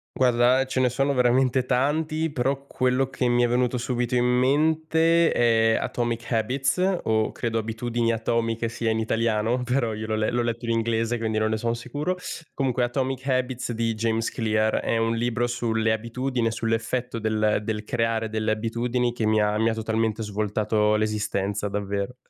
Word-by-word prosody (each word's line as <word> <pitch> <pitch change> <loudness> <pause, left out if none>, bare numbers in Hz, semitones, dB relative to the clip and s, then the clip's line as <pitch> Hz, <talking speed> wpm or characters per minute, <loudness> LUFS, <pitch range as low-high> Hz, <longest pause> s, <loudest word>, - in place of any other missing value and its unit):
Guarda, 125 0 +4
ehm, 135 - +1
ce 130 - -1
ne 130 -1 +3
sono 135 +3 0
veramente 125 +1 +2
tanti, 155 +5 0
però 135 +1 -1
quello 130 +1 0
che 125 -2 -1
mi 120 0 +3
è - - +3
venuto 125 +1 +1
subito 125 0 -2
in 125 0 +3
mente 160 +6 +3
è 115 -1 +3
"Atomic 120 0 -3
Habits" 135 - +1
o 110 -1 +1
credo 115 -1 -2
Abitudini 115 +1 -1
Atomiche 115 0 -1
sia 115 0 -1
in 110 - 0
italiano, 115 +2 0
però 125 -2 0
io 110 +1 -5
l'ho 110 - -3
le 110 0 0
l'ho 120 0 0
letto 120 0 -3
in 115 - -1
inglese, 115 +1 0
quindi 110 -1 -1
non 110 0 +1
ne 110 - 0
sono 115 +1 -1
sicuro, 145 +9 -3 0.4
comunque 130 -2 0
"Atomic 130 +1 -2
Habits" 130 -1 -1
di 115 -1 -1
James 115 +1 0
Clear. 110 -2 0
È 115 - 0
un 115 0 +1
libro 120 +1 0
sulle 115 -2 0
abitudini, 120 +3 -2
e - - 0
sull'effetto 115 +2 -2
del 110 -1 +1
del 105 0 -3
creare 115 -1 -1
delle 110 0 -1
abitudini 120 +2 -1
che 115 - -2
mi 110 0 +3
ha 105 0 +1
mi 110 +1 +2
ha - - -1
totalmente 110 0 -1
svoltato 105 0 0
l'esistenza, 105 -1 -1
davvero. 100 +3 -3
115 Hz, 180 wpm, -25 LUFS, 110-125 Hz, 0.4 s, Guarda